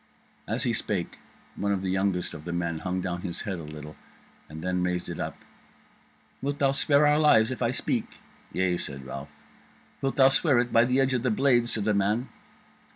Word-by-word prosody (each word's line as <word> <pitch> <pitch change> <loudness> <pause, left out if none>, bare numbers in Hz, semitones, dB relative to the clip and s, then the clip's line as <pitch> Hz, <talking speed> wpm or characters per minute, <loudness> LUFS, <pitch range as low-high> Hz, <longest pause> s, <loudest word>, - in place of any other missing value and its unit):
As 115 +5 -1
he 120 -3 +1
spake, 100 -5 -2 0.4
one 100 +1 -1
of 95 -1 -1
the 95 - -1
youngest 95 -2 0
of 75 -3 -9
the 85 - -5
men 85 -2 -2
hung 90 +1 -2
down 90 -1 -3
his 90 -3 -5
head 95 -4 -4
a - - -7
little, 75 0 -9 0.5
and 80 +2 -8
then 90 0 0
raised 90 0 -1
it - - -5
up: - - -4 1.0
"Wilt 140 +1 -2
thou 140 -1 +3
spare 140 +1 +3
our 150 +1 +4
lives 115 -7 +5
if 130 - -5
I 120 - +2
speak?" 125 - -2 0.3
"Yea," 90 -1 +1
said 70 -4 -6
Ralph. 70 +2 -7 0.7
"Wilt 135 0 -1
thou 135 -1 +6
swear 140 -1 +3
it 120 0 +1
by 115 +1 +6
the 125 +2 +2
edge 135 -1 +2
of 125 - +1
the 125 - +1
blade?" 120 0 +3
said 110 - -1
the 105 +1 +2
man. 105 +5 0
100 Hz, 210 wpm, -27 LUFS, 90-130 Hz, 1.0 s, thou